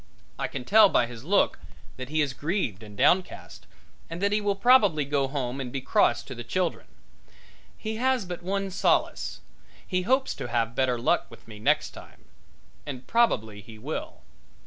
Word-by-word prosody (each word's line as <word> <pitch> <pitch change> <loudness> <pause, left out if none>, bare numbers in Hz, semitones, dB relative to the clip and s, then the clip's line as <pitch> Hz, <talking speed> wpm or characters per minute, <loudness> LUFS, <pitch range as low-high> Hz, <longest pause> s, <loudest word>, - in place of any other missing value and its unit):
I - - -1
can 125 - -6
tell 210 0 +7
by 120 - +3
his 115 -1 -10
look 195 +7 +2 0.4
that 130 0 -7
he 155 0 +2
is 140 -3 -3
grieved 145 - -2
and 105 -2 -12
downcast, 185 - 0 0.4
and 165 - -6
that 200 +1 +1
he 210 +1 +1
will 205 -1 0
probably 200 - +4
go 140 -1 0
home 135 -1 -3
and 125 -2 -5
be 135 - -3
cross 120 -2 +2
to 130 - -8
the 120 -1 -7
children. 180 +7 -2 0.9
He 220 0 -4
has 255 -3 +1
but 175 -1 -6
one 195 +2 -2
solace 190 - 0 0.4
he 185 -1 -1
hopes 260 +7 +1
to - - -5
have 115 -1 -1
better 125 -1 +1
luck 120 - +1
with - - -16
me 105 -2 -11
next 105 - +1
time. - - -14 0.6
And 130 -3 -7
probably 110 - +1
he 110 +1 -13
will. 140 +9 -6
145 Hz, 180 wpm, -26 LUFS, 120-195 Hz, 0.9 s, tell